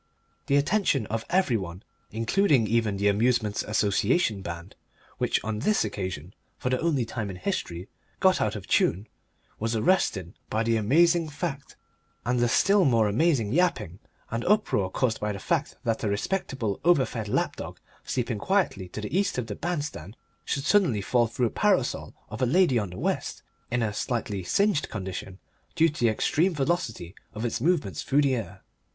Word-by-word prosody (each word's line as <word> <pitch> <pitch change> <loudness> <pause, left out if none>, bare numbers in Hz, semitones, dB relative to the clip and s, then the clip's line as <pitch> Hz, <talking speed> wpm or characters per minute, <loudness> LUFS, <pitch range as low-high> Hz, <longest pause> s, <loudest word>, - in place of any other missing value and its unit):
The 140 - +2
attention 145 - +2
of 115 0 -2
every 180 -10 +2
one 90 -1 -7 0.3
including 125 - +2
even 110 -2 +1
the 100 +1 +1
Amusements' 110 0 +2
Association 105 - +1
band, 85 +1 -7 0.4
which - - +1
on 110 0 -3
this 215 - +2
occasion, 95 -3 -5 0.2
for 125 - -2
the 130 - +1
only 150 -7 +1
time 110 -2 -4
in 95 - -6
its - - -18
history, 90 - -3 0.3
got - - +4
out - - 0
of - - -7
tune 95 +5 +2 0.5
was 115 +1 -1
arrested 105 - +1 0.2
by 110 +1 0
the 115 0 +1
amazing 165 - +3
fact, 145 -2 -5 0.5
and 125 +1 +1
the 120 0 +2
still 200 - +4
more 115 -7 +3
amazing 115 -1 +2
yapping 120 - 0 0.3
and 115 +1 -2
uproar 195 - +2
caused 115 +3 0
by 105 0 -1
the - - -5
fact 100 - -1
that 115 -1 -1
a 105 - +1
respectable, 115 - -2
over 170 -6 +4
fed 110 -3 -5
lap - - 0
dog - - -7 0.2
sleeping 120 -4 -2
quietly 185 - 0
to 105 - -6
the 105 +10 -4
east 195 -6 +1
of 125 - -1
the 105 -2 -5
bandstand 145 - -4 0.3
should 140 - -2
suddenly 170 - +3
fall 120 +3 +2
through 120 +1 0
the - - -19
parasol 195 - +1
of - - -7
a 130 - +3
lady 150 -3 +4
on 100 -3 -3
the 90 - -9
west - - -2 0.3
in 120 -1 0
a 105 -2 -1
slightly 105 -3 -2
singed 200 - +1
condition 95 -2 -6 0.4
due 165 0 +4
to 155 - -9
the 120 - +4
extreme 165 - +1
velocity 135 - -2 0.2
of 110 +3 -3
its 115 - -2
movements 140 - 0
through 145 +2 +2
the 135 -2 +2
air. 115 -4 -5
115 Hz, 180 wpm, -26 LUFS, 105-155 Hz, 0.5 s, got